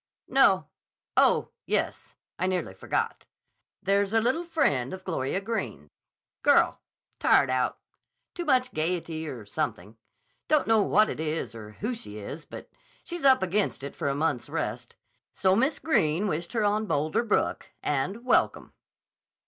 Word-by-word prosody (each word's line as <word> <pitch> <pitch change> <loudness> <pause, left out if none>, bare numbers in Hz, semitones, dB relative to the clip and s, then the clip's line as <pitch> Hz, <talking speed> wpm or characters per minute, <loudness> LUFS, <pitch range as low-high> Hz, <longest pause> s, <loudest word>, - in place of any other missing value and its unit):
"No. - - +4 0.5
Oh, - - +4 0.2
yes. - - -2 0.2
I 185 - +1
nearly 180 - -1
forgot. 95 - -2 0.6
There's 200 +1 +2
a 225 - +5
little 255 +9 +1
friend 190 - 0
of 190 - -13
Gloria 165 -2 -1
Greene's. 195 - -4 0.5
Girl. - - +4 0.4
Tired 135 - +4
out. 130 0 0 0.6
Too 350 - -4
much 255 -5 +2
gayety 160 -1 -2
or 120 -7 -7
something. 105 +1 -4 0.5
Don't 305 -1 +3
know 225 -1 +4
what 210 +2 +4
it - - -5
is 155 -4 -2
or 105 -2 -10
who 225 +5 -1
she 105 - -8
is, 125 +10 -7
but - - -10 0.4
she's 345 -2 -6
up 265 -7 +6
against 190 -5 0
it 140 - -6
for - - -2
a 140 - 0
month's 145 -4 -1
rest. - - -4 0.4
So 190 0 +3
Miss 265 +8 +2
Greene 185 - +1
wished 170 +2 -3
her 220 -3 +1
on 210 +1 +1
Boulder 155 +6 +1
Brook, 220 - 0
and 150 - -1
welcome." - - +2
185 Hz, 150 wpm, -27 LUFS, 145-225 Hz, 0.6 s, up